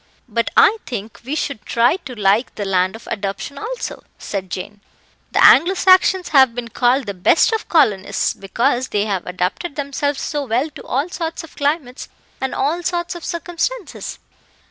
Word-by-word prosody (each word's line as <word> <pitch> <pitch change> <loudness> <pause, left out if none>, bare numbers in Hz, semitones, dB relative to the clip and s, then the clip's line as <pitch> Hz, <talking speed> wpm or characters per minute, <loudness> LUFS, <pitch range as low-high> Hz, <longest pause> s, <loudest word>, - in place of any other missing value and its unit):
"But 230 0 -1
I 445 - +6
think 220 -3 -6
we 270 +5 -3
should 280 -7 -3
try 240 +8 +2
to 255 - -7
like 210 +3 +1
the 205 - -3
land 185 0 +1
of 225 - -12
adoption 205 +7 -4
also," 480 +3 -5
said 190 -2 -5
Jane. 200 +3 -6 0.5
"The - - +5
Anglo 350 +7 +7
Saxons 370 0 +4
have 265 -5 +5
been 240 -1 -5
called 250 +3 +2
the 200 - -4
best 190 - +3
of 445 - -2
colonists, 210 - +2
because 245 +6 0
they 205 0 0
have 195 -4 -2
adapted 185 - -3
themselves 285 0 -2
so 295 -2 -2
well 255 +7 0
to - - -11
all 280 +7 -1
sorts 330 -2 -4
of 325 - -13
climates 285 -3 -2 0.3
and 265 - -2
all 310 +6 0
sorts 345 0 -2
of 345 -2 -9
circumstances." 350 +6 -4
265 Hz, 170 wpm, -19 LUFS, 210-325 Hz, 0.5 s, Anglo